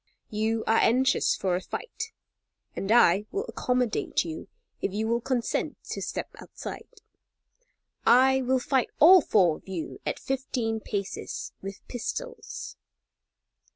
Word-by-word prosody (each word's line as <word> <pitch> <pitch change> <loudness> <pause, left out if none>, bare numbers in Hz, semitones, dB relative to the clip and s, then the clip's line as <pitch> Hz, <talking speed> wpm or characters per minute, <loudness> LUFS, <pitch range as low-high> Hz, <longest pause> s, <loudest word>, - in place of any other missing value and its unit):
You 220 +1 0
are 225 - +4
anxious 255 +3 +3
for 185 -2 0
a 180 - -2
fight, 450 - -6 0.6
and 195 - -2
I 210 -3 +5
will 405 +3 -2
accommodate 250 - 0
you 160 -1 -6 0.3
if - - -1
you 215 +3 -1
will 235 +1 +1
consent 245 -1 -1
to - - -3
step - - -4
outside. - - -8 1.1
I 265 +3 +5
will 260 +1 +2
fight 260 0 +1
all 355 +4 +9
four 180 - +3
of - - -22
you 180 -4 -5
at - - -2
fifteen 250 -4 -2
paces 200 -2 -4
with 195 0 -8
pistols." 475 - -5
235 Hz, 130 wpm, -27 LUFS, 205-265 Hz, 1.1 s, all